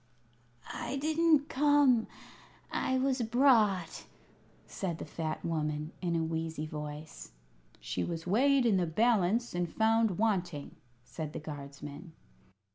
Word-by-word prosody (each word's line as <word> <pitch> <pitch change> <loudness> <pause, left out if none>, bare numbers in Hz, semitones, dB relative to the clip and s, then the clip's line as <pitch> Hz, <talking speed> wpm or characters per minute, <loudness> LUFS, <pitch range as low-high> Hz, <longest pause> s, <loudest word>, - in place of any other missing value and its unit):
"I 255 - -4
didn't 310 0 +2
come; 280 -4 +4 0.6
I 260 - 0
was 260 -1 +1
brought," 225 - +2 0.6
said 175 -4 -4
the - - -6
fat 155 0 -4
woman, 150 -1 -2
in 170 -2 -1
a 165 - +1
wheezy 160 -1 -3
voice. 150 - -8 0.5
"She 90 - -3
was 165 -1 -4
weighed 260 +7 +3
in 215 -5 +4
the 180 -2 +1
balance 220 +4 +2
and 175 -1 -1
found 225 -3 +2
wanting," 180 -9 -1 0.3
said 155 +1 -6
the - - -4
guardsman. 145 +2 -9
180 Hz, 120 wpm, -31 LUFS, 160-240 Hz, 0.6 s, come